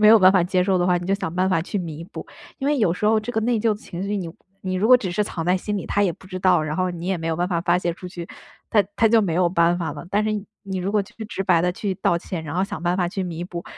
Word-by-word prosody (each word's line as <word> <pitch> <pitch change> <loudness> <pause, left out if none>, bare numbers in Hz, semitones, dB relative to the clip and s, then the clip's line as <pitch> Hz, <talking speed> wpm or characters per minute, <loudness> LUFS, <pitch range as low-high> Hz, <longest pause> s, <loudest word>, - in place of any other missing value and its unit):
没 210 - +7
有 225 0 +9
办 185 -1 +7
法 185 -3 +3
接 180 0 +1
受 190 0 +2
的 175 0 +1
话， 180 -1 +3
你 175 - -7
就 195 - +2
想 190 -4 -4
办 185 +1 +2
法 165 -4 +1
去 200 +3 -3
弥 165 -2 -6
补。 195 - -9 0.3
因 275 +1 -1
为 295 - +2
有 185 -7 +3
时 210 +4 -1
候 220 0 +4
这 230 +3 -4
个 220 - 0
内 230 0 +1
疚 225 +1 +2
的 - - +2
情 180 -3 -7
绪， 200 +1 -2
你 170 -3 -5 0.3
你 185 -1 -3
如 195 +4 +1
果 255 - +8
只 195 -7 +2
是 210 +4 0
藏 165 - -4
在 180 +2 +3
心 205 +2 -3
里， - - -6
他 205 - +1
也 185 -4 +2
不 190 - -16
知 185 0 -5
道， 180 -3 +3
然 155 0 -3
后 185 0 0
你 175 0 -6
也 190 -1 +1
没 165 - -5
有 160 - +1
办 175 +1 0
法 170 -3 0
发 175 0 +3
泄 175 -2 -2
出 180 - -9
去， 175 -2 -7 0.4
它 210 -2 +4
它 225 - +4
就 225 -1 +5
没 175 -5 -1
有 175 +1 +3
办 170 0 +2
法 165 -3 -2
了。 150 +3 -9
但 205 +1 +2
是 215 - 0 0.3
你 195 -2 -5
如 185 +2 -2
果 210 - +3
去 195 - -16
直 195 -2 -4
白 180 -4 +3
地 180 0 +1
去 195 0 -3
道 170 -1 +1
歉， 170 -2 -6
然 150 +2 -5
后 185 - +1
想 195 - -4
办 175 +1 +1
法 180 -2 0
去 190 +1 -3
弥 170 -1 -4
补， 175 -1 -6
185 Hz, 360 characters per minute, -23 LUFS, 175-200 Hz, 0.4 s, 有